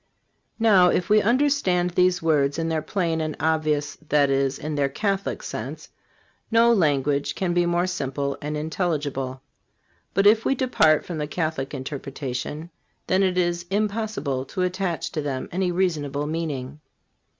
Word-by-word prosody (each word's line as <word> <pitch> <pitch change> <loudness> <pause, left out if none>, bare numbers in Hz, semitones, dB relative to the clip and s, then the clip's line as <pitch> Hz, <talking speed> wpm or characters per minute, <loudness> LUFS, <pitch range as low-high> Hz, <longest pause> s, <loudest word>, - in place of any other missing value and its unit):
Now, 200 -6 +5
if 180 +3 0
we 215 0 +6
understand 230 -7 +2
these 180 0 +2
words 145 -3 +2
in 165 0 -1
their 160 -1 0
plain 165 -2 -1
and 155 -1 -3
obvious; 155 -3 0
that 145 -2 +3
is, 135 0 +1
in 155 +1 -5
their 140 -1 +1
Catholic, 195 +6 -2
sense, - - -6 0.6
no 235 +1 +5
language 145 - +1
can 180 -2 -1
be 175 0 +2
more 175 +1 +1
simple 140 -5 -2
and 150 +1 -3
intelligible. 145 -5 -2 0.7
But 195 +1 +3
if 220 +2 +6
we 270 - +1
depart 160 - +3
from 170 -3 -5
the 150 - -2
Catholic 155 -3 -3
interpretation, 135 +3 -5 0.3
then 185 +1 +2
it 185 -2 +1
is 175 -1 0
impossible 205 - -1
to 185 +7 -3
attach 180 -2 -2
to 155 - -2
them 135 -3 -3
any 180 0 0
reasonable 150 -6 -1
meaning. 150 -3 -4
160 Hz, 150 wpm, -24 LUFS, 145-185 Hz, 0.7 s, we